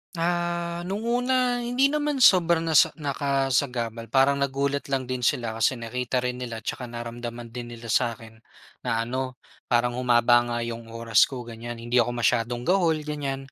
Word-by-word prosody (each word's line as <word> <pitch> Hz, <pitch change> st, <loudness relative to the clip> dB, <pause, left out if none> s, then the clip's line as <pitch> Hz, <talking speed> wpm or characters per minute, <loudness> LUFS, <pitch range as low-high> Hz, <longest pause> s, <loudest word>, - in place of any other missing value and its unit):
Ah, 175 Hz, 0 st, -1 dB
no'ng 200 Hz, +3 st, -3 dB
una, 245 Hz, +1 st, +1 dB
hindi 245 Hz, +3 st, +2 dB
naman 295 Hz, -3 st, 0 dB
sobra 170 Hz, -4 st, +5 dB
na 165 Hz, -, -1 dB
sa -, -, +3 dB
nakasagabal. 135 Hz, -5 st, -1 dB
Parang 140 Hz, +2 st, +3 dB
nagulat 140 Hz, +1 st, -1 dB
lang 135 Hz, -1 st, -1 dB
din 130 Hz, 0 st, -4 dB
sila 120 Hz, -1 st, 0 dB
kasi 130 Hz, -, +3 dB
nakita 125 Hz, +2 st, -2 dB
rin 125 Hz, 0 st, -2 dB
nila 115 Hz, -3 st, -6 dB
'tsaka 125 Hz, -, -4 dB
naramdaman 120 Hz, 0 st, -7 dB
din 120 Hz, 0 st, -7 dB
nila 115 Hz, -1 st, -7 dB
sa'kin, 110 Hz, 0 st, -1 dB, 0.5 s
na 115 Hz, 0 st, +1 dB
ano, 130 Hz, +1 st, -3 dB, 0.3 s
parang 120 Hz, 0 st, +1 dB
humaba 120 Hz, -1 st, +4 dB
nga 120 Hz, 0 st, -2 dB
'yong 115 Hz, 0 st, -6 dB
oras 115 Hz, -2 st, +4 dB
ko, 125 Hz, -3 st, -6 dB
ganiyan. 115 Hz, +1 st, -7 dB
Hindi 120 Hz, +1 st, +2 dB
ako 120 Hz, +1 st, +1 dB
masyadong 120 Hz, +2 st, +1 dB
gahol, 165 Hz, -2 st, +2 dB
ganiyan. 140 Hz, -3 st, -4 dB
125 Hz, 165 wpm, -25 LUFS, 120-160 Hz, 0.5 s, sobra